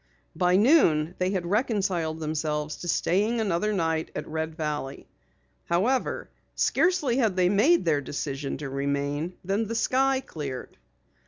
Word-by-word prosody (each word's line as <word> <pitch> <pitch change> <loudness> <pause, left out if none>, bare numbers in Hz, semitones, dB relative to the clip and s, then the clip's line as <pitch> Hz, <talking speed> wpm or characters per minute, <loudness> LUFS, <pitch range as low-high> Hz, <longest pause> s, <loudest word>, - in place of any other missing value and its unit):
By 180 +2 +3
noon 185 - +4
they 185 0 +1
had 185 -3 -2
reconciled 190 -6 0
themselves 150 -1 -2
to 175 - -7
staying 210 +7 +1
another 210 -1 0
night 165 -5 0
at - - -4
Red 160 0 -3
Valley. 150 -4 -4 0.6
However, 220 +10 0 0.3
scarcely 300 -5 +2
had 220 -8 +2
they 180 -1 +3
made 220 - +4
their 150 -3 +2
decision 140 0 -4
to 145 - -5
remain, 140 +4 -2
than 200 +4 0
the 230 - -4
sky 265 +3 +2
cleared. 145 - -7
175 Hz, 140 wpm, -26 LUFS, 150-220 Hz, 0.6 s, noon